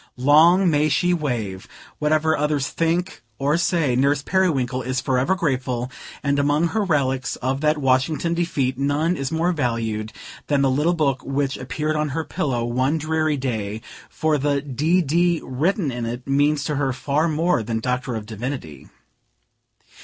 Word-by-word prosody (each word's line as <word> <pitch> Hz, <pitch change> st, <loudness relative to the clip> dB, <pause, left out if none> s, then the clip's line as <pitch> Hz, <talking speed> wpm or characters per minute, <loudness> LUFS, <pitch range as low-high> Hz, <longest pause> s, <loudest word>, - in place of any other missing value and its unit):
Long 160 Hz, +8 st, +5 dB
may 155 Hz, -2 st, +3 dB
she 180 Hz, +4 st, +2 dB
wave! 115 Hz, -, -3 dB, 0.3 s
Whatever 155 Hz, +1 st, +2 dB
others 150 Hz, -2 st, 0 dB
may 165 Hz, -, +1 dB
think 175 Hz, +3 st, -1 dB, 0.2 s
or 140 Hz, +4 st, +1 dB
say, 165 Hz, -6 st, +1 dB
Nurse 140 Hz, +2 st, +2 dB
Periwinkle 135 Hz, -10 st, +1 dB
is 130 Hz, +1 st, -2 dB
forever 130 Hz, +7 st, +1 dB
grateful; 130 Hz, -6 st, -2 dB, 0.3 s
and 140 Hz, 0 st, +1 dB
among 145 Hz, +4 st, +2 dB
her 220 Hz, -, 0 dB
relics 135 Hz, -7 st, 0 dB
of 135 Hz, +2 st, -2 dB
that 155 Hz, 0 st, +2 dB
Washington 135 Hz, +4 st, +1 dB
defeat, 140 Hz, -7 st, -1 dB
none 145 Hz, +5 st, +1 dB
is 135 Hz, -4 st, -3 dB
more 165 Hz, +2 st, +1 dB
valued 115 Hz, -7 st, -2 dB, 0.4 s
than 140 Hz, -2 st, +2 dB
the 135 Hz, -, +3 dB
little 150 Hz, +6 st, +2 dB
book 140 Hz, -5 st, 0 dB
which 135 Hz, 0 st, -1 dB
appeared 155 Hz, +4 st, -3 dB
on 150 Hz, 0 st, 0 dB
her 160 Hz, -, 0 dB
pillow, 125 Hz, -7 st, -2 dB
one 130 Hz, +6 st, 0 dB
dreary 155 Hz, -1 st, 0 dB
day; 110 Hz, -5 st, -3 dB, 0.3 s
for 155 Hz, -2 st, 0 dB
the 140 Hz, 0 st, +1 dB
D. 155 Hz, +6 st, +1 dB
D. 170 Hz, +3 st, +2 dB
written 155 Hz, -, 0 dB
in 120 Hz, -1 st, -4 dB
it 120 Hz, +2 st, -5 dB
means 145 Hz, +1 st, +2 dB
to 150 Hz, -2 st, -2 dB
her 135 Hz, -2 st, 0 dB
far 145 Hz, +5 st, 0 dB
more 165 Hz, -2 st, +1 dB
than 110 Hz, +1 st, -2 dB
Doctor 125 Hz, +1 st, -2 dB
of 110 Hz, -1 st, -5 dB
Divinity. 110 Hz, -, -6 dB
145 Hz, 165 wpm, -22 LUFS, 130-160 Hz, 0.4 s, Long